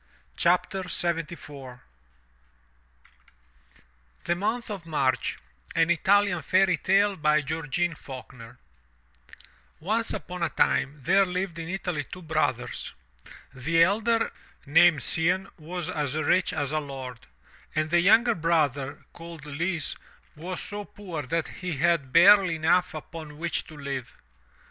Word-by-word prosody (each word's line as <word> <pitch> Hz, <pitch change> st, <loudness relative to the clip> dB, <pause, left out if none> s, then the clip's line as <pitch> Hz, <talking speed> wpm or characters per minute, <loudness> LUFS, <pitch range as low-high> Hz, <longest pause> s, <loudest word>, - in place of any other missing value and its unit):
347 180 Hz, 0 st, +1 dB
MY 165 Hz, -, -2 dB
BOOK 170 Hz, +2 st, -11 dB, 0.3 s
HOUSE 125 Hz, 0 st, -13 dB, 2.4 s
THE 175 Hz, -, 0 dB
MONTH 220 Hz, +5 st, -2 dB
OF 185 Hz, -5 st, -7 dB
MARCH* 130 Hz, -6 st, 0 dB, 0.4 s
An 165 Hz, +1 st, +3 dB
Italian 200 Hz, +1 st, +3 dB
Fairy 185 Hz, +3 st, +3 dB
Tale 195 Hz, +2 st, +2 dB
Georgene 155 Hz, +2 st, 0 dB
Faulkner 125 Hz, -4 st, -11 dB, 1.2 s
Once 220 Hz, +7 st, -1 dB
upon 180 Hz, 0 st, -6 dB
a 170 Hz, -, +1 dB
time 140 Hz, 0 st, +1 dB
there 195 Hz, +7 st, +4 dB
lived 180 Hz, -1 st, -3 dB
in 165 Hz, 0 st, -6 dB
Italy 180 Hz, -5 st, -3 dB
two 180 Hz, +6 st, -10 dB
brothers; 155 Hz, -6 st, -2 dB, 0.6 s
the 165 Hz, +6 st, +3 dB
elder, 225 Hz, +5 st, +1 dB, 0.3 s
named 160 Hz, +2 st, +5 dB
Cianne, 185 Hz, +4 st, +3 dB
was 170 Hz, +2 st, -5 dB
as 145 Hz, -2 st, -2 dB
rich 155 Hz, +4 st, +2 dB
as 145 Hz, -1 st, -2 dB
a 155 Hz, -, +1 dB
lord; 135 Hz, -4 st, -7 dB, 0.6 s
and 155 Hz, 0 st, 0 dB
the 175 Hz, -, +5 dB
younger 230 Hz, +6 st, +5 dB
brother, 150 Hz, -, 0 dB
called 165 Hz, -3 st, -10 dB
Lise, 160 Hz, +2 st, -2 dB, 0.4 s
was 175 Hz, +3 st, -6 dB
so 205 Hz, 0 st, -6 dB
poor 185 Hz, -6 st, -7 dB
that 155 Hz, +5 st, -2 dB
he 180 Hz, -2 st, -5 dB
had 165 Hz, -4 st, +1 dB
barely 190 Hz, +1 st, +7 dB
enough 160 Hz, +2 st, +2 dB
upon 155 Hz, -1 st, -9 dB
which 170 Hz, +1 st, -2 dB
to 155 Hz, -, -12 dB
live. 140 Hz, -3 st, -5 dB
165 Hz, 125 wpm, -26 LUFS, 150-185 Hz, 2.4 s, barely